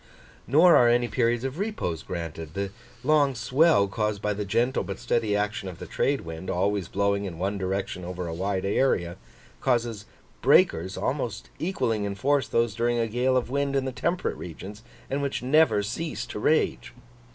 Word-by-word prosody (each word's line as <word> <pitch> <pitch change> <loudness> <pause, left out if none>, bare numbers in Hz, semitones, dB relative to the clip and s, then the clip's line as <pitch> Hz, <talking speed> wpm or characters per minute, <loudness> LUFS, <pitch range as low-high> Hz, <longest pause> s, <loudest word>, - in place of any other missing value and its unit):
Nor 165 +7 +6
are 120 - +6
any 120 0 +3
periods 120 -1 +1
of 135 +5 -4
repose 200 - -2
granted. 80 -2 -6
The 100 0 -2 0.3
long 145 -1 +3
swell 125 0 +3
caused 105 0 -1
by 105 0 -1
the 105 0 -4
gentle 120 +6 +1
but 100 -1 -5
steady 115 -3 0
action 105 0 -2
of 90 - -9
the - - -8
trade 140 0 0
wind, 80 +2 -7
always 95 0 0
blowing 100 +1 0
in 90 -4 -6
one 100 +3 -2
direction 95 -1 -3
over 90 0 -5
a 85 - -4
wide 95 +2 -2
area, 100 -5 +1 0.4
causes 120 -5 0 0.4
breakers, 90 +4 +3
almost 120 -6 -3
equalling 120 - -1
in 100 -1 -3
force 140 +4 +1
those 115 -2 +1
during 120 +2 0
a 115 - +2
gale 125 +3 +1
of 125 -1 -2
wind 140 0 0
in 135 -1 +1
the 130 - -2
temperate 170 +7 -1
regions, 95 +5 -8 0.3
and 140 +2 -2
which 140 -3 -2
never 130 -6 +4
cease 145 +10 -4
to - - -6
rage. 120 -3 +1
115 Hz, 180 wpm, -26 LUFS, 100-130 Hz, 0.4 s, Nor